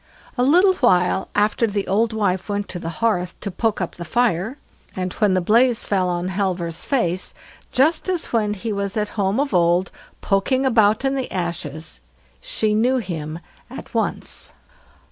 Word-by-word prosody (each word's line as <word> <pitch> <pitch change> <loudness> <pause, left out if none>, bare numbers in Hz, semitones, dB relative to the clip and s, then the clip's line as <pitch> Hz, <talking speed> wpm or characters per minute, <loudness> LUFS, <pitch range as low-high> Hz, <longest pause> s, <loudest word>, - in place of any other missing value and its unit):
A 245 - 0
little 355 +9 +5
while 185 -5 +2
after 210 +3 +2
the 205 -2 -2
old 220 +4 +2
wife 200 -3 -1
went 205 0 -2
to 180 - -5
the 165 - -5 0.2
hearth 180 -5 0
to 200 - -4
poke 220 +4 -1
up 180 - -4
the 175 - -5
fire, 230 - 0 0.4
and 185 -1 -3
when 205 -3 +2
the 185 - +2
blaze 235 +5 +3
fell 185 -3 +1
on 175 +1 -2
Halvor's 180 -3 -2
face, 185 -10 0 0.4
just 310 +7 +2
as 360 -8 -2
when 210 -2 +1
he 215 +2 -4
was 200 +1 -3
at 210 -1 0
home 200 +2 0
of 285 -1 -1
old 175 +1 +3 0.3
poking 255 +7 +1
about 220 -1 +3
in 270 - +2
the 265 -2 -3
ashes, 165 -3 -4 0.4
she - - 0
knew 245 +5 +2
him 165 -8 -4 0.3
at - - -10
once. - - -3
205 Hz, 170 wpm, -21 LUFS, 180-235 Hz, 0.4 s, little